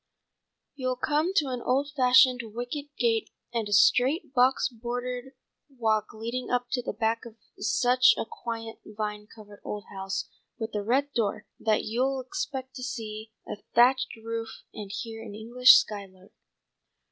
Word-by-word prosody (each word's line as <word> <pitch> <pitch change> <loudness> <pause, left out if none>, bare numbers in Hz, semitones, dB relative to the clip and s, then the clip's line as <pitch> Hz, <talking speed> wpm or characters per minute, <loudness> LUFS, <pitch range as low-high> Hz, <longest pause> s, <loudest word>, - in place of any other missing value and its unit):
You'll 255 -2 -2
come 305 +6 +1
to 295 -8 +2
an 250 -1 -3
old 275 +4 0
fashioned 255 -1 +6
wicket 245 +5 -4
gate 230 -2 +1 0.2
and 225 -3 -1
a - - -8
straight, 265 - +4
box 255 +1 +4
bordered 245 +2 -5 0.4
walk 220 -5 0
leading 235 +3 -4
up 245 0 0
to 255 - 0
the - - -3
back 225 0 -1
of 235 -3 -11 0.2
such 250 0 +4
a - - -2
quaint 225 0 -6
vine 210 0 -5
covered 210 -2 -14
old 210 -1 -5
house 195 0 -4 0.3
with 225 0 -5
a 210 - -1
red 270 +7 +1
door, 215 -2 -1
that 215 -1 +1
you'll 260 +4 0
expect 260 -3 -5
to 255 - -6
see 220 -4 -6 0.2
a - - -5 0.2
thatched 260 +2 +4
roof 225 0 -5 0.2
and 205 -2 -7
hear 225 +1 -6
an 205 - -8
English 240 +4 +7
skylark." 195 -2 -2
240 Hz, 155 wpm, -27 LUFS, 220-255 Hz, 0.4 s, English